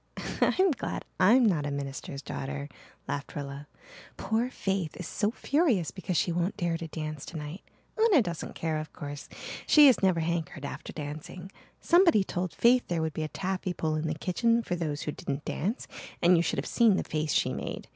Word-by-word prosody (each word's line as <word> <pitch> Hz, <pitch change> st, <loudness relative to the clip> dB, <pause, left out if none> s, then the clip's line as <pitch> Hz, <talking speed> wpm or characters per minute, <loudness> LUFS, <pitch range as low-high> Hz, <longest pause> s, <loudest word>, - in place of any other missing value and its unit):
"I'm 375 Hz, -1 st, +4 dB
glad 265 Hz, -, -4 dB
I'm 230 Hz, +7 st, +6 dB
not 160 Hz, -9 st, +2 dB
a -, -, -1 dB
minister's 140 Hz, 0 st, -5 dB
daughter," 140 Hz, +1 st, -4 dB, 0.4 s
laughed 145 Hz, 0 st, -4 dB
Rilla. 140 Hz, 0 st, -6 dB, 0.5 s
"Poor 225 Hz, +3 st, 0 dB
Faith 195 Hz, -9 st, -2 dB
is 180 Hz, -, -5 dB
so 205 Hz, -, 0 dB
furious 250 Hz, -, +1 dB
because 185 Hz, -2 st, -3 dB
she 175 Hz, -, +2 dB
won't 175 Hz, +3 st, -1 dB
dare 170 Hz, -1 st, 0 dB
to 165 Hz, 0 st, -5 dB
dance 155 Hz, -2 st, -5 dB
tonight. 155 Hz, +2 st, -7 dB, 0.4 s
Una 400 Hz, -, +6 dB
doesn't 170 Hz, -4 st, -5 dB
care, 160 Hz, -1 st, -1 dB
of 155 Hz, -1 st, -7 dB
course. 145 Hz, -1 st, -7 dB, 0.4 s
She 300 Hz, -1 st, +8 dB
has 265 Hz, -3 st, +6 dB
never 185 Hz, -4 st, +3 dB
hankered 160 Hz, -3 st, -2 dB
after -, -, -6 dB
dancing. 155 Hz, +5 st, -7 dB, 0.3 s
Somebody 340 Hz, -, +5 dB
told 180 Hz, -1 st, -3 dB
Faith 245 Hz, +1 st, +4 dB
there 170 Hz, -2 st, 0 dB
would 160 Hz, -1 st, -2 dB
be 155 Hz, -, -3 dB
a 155 Hz, -, -1 dB
taffy 185 Hz, +2 st, -3 dB
pull 160 Hz, -2 st, -1 dB
in 155 Hz, +1 st, -1 dB
the 155 Hz, -, -1 dB
kitchen 230 Hz, +8 st, +1 dB
for 180 Hz, -, -2 dB
those 155 Hz, -4 st, -3 dB
who 150 Hz, -, -2 dB
didn't 140 Hz, 0 st, -5 dB
dance 210 Hz, -, -2 dB, 0.3 s
and 175 Hz, +1 st, +5 dB
you 165 Hz, -, +4 dB
should -, -, -1 dB
have -, -, -1 dB
seen 230 Hz, -5 st, +4 dB
the -, -, 0 dB
face 155 Hz, -1 st, -2 dB
she -, -, +2 dB
made. -, -, -5 dB
170 Hz, 195 wpm, -29 LUFS, 155-205 Hz, 0.5 s, She